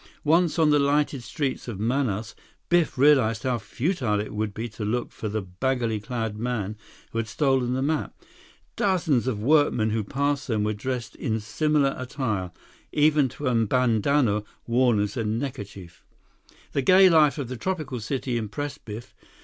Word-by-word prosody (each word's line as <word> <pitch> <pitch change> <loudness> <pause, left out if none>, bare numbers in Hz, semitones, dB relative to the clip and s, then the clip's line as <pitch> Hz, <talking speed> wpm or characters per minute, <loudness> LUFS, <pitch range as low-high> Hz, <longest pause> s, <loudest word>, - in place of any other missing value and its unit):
Once 165 +2 +3
on 155 -2 +4
the 150 - +4
lighted 140 -1 +1
streets 135 +2 -3
of 110 -5 -5
Manaus, 115 -2 -1 0.4
Biff 175 -5 +2
realized 130 -5 +4
how 125 -3 0
futile 120 - -1
it 105 - -4
would 105 0 -2
be 110 +3 -5
to 110 0 -7
look 120 +4 -2
for 110 - -5
the 105 0 -2
baggily 115 +4 -1
clad 115 -2 -4
man 110 -4 -2 0.4
who 115 - -2
had 115 - -2
stolen 130 +1 +1
the 130 - -1
map. 150 +1 -2 0.6
Dozens 160 - +1
of 105 -5 -2
workmen 135 -6 +3
who 110 0 0
passed 140 +5 -1
them 110 -4 0
were 105 0 0
dressed 125 +3 -4
in 110 -1 -1
similar 140 +5 +1
attire, 125 -8 -2 0.4
even 150 -2 +3
to 145 - -8
a 125 - +2
bandanna 115 0 +2 0.2
worn 120 -2 +3
as 105 0 -1
a 115 - 0
neckerchief. 105 - -5 0.7
The 140 - 0
gay 185 +7 +7
life 155 -4 +5
of 140 -4 -3
the 130 - -5
tropical 155 -4 -3
city 125 +1 -2
impressed 140 +7 -5
Biff. 110 +2 -8
125 Hz, 165 wpm, -25 LUFS, 110-145 Hz, 0.7 s, gay